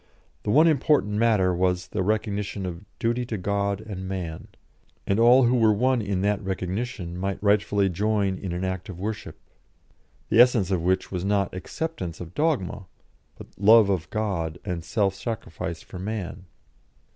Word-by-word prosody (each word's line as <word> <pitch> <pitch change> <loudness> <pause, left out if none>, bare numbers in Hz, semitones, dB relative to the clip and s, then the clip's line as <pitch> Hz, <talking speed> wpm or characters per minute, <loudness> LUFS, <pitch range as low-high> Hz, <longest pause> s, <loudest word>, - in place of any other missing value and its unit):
The - - -4
one 155 +9 +6
important 145 - +2
matter 105 -4 +3
was 90 0 0
the - - -2
recognition 105 -1 -1
of 90 +2 -6
"duty 120 +1 0
to 110 - -3
God 100 +1 -1
and 95 -4 -7
man," 90 -4 -5 0.6
and 100 +2 +1
all 120 +3 +7
who 120 +1 +3
were 115 -3 +4
one 125 +3 +2
in 100 -3 -2
that 105 +1 0
recognition 95 0 -3
might 95 +2 -2
rightfully 100 -1 +2
join 100 +1 0
in 95 - -5
an 90 +2 -3
act 95 0 -3
of 95 - -7
worship, 105 +2 -5 0.9
the - - +3
essence 115 -7 +4
of 90 -3 +1
which 95 +2 0
was 90 -2 -3
not 100 -1 0
acceptance 95 - -5
of 85 0 -8
dogma, 120 - -1 0.5
but - - -10
love 105 0 +6
of 85 -4 -2
God 85 -7 -2
and 85 -2 -3
self 100 +1 0
sacrifice 95 -6 -5
for 90 - -9
man. 95 -2 -5
100 Hz, 165 wpm, -25 LUFS, 90-110 Hz, 0.9 s, all